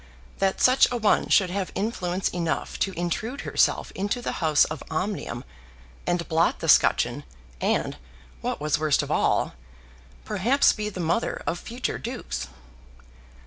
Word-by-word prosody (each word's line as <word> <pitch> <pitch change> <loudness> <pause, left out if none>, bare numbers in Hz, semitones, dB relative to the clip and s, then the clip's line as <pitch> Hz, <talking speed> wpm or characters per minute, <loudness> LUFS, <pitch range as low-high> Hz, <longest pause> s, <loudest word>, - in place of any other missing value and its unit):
That 195 -1 +1
such 255 +1 +6
a 245 - 0
one 215 -3 +2
should 185 -3 +4
have 190 0 -2
influence 190 -3 -1
enough 170 -2 -2
to 195 - +1
intrude 220 - -2
herself - - +1
into 205 +5 -2
the 240 - -3
house 155 -3 +4
of 155 - -6
Omnium, 160 - -3 0.6
and 175 -1 0
blot 165 +1 +2
the 165 - -5
scutcheon, 135 -3 +4 0.4
and, - - 0 0.4
what - - -2
was 150 0 0
worst 155 -2 +2
of - - -5
all, - - +1 0.7
perhaps 250 - +3
be 210 0 -3
the 190 - -8
mother 170 +6 -1
of 175 - -1
future 245 +2 -4
dukes! 70 - -5
180 Hz, 145 wpm, -25 LUFS, 160-215 Hz, 0.7 s, such